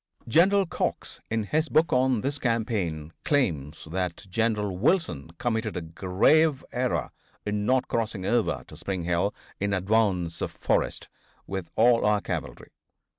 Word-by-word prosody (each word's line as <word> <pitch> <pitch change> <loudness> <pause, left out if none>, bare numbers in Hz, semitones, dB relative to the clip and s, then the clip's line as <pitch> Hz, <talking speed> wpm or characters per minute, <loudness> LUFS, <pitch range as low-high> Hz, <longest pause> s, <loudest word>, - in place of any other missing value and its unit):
General 190 - +4
Cox, - - -3
in 110 -1 0
his 155 +9 0
book 155 0 +3
on 130 -3 +3
this 140 +3 -2
campaign, 105 - -1
claims 80 - 0
that 90 +1 -3
General 105 -1 0
Wilson 115 - +1
committed 110 -3 -1
a - - -2
grave 100 - +2
error 120 - -1 0.3
in 105 0 -1
not 130 0 +2
crossing 110 -4 -2
over 120 +1 +1
to - - -12
Spring 95 -3 -3
Hill, 85 +4 +1 0.3
in 100 0 0
advance 95 -3 +1
of - - -1
Forrest, - - 0 0.4
with 95 -4 -5
all 115 +1 +5
our 105 0 +3
cavalry. - - -5
105 Hz, 140 wpm, -27 LUFS, 90-125 Hz, 0.4 s, all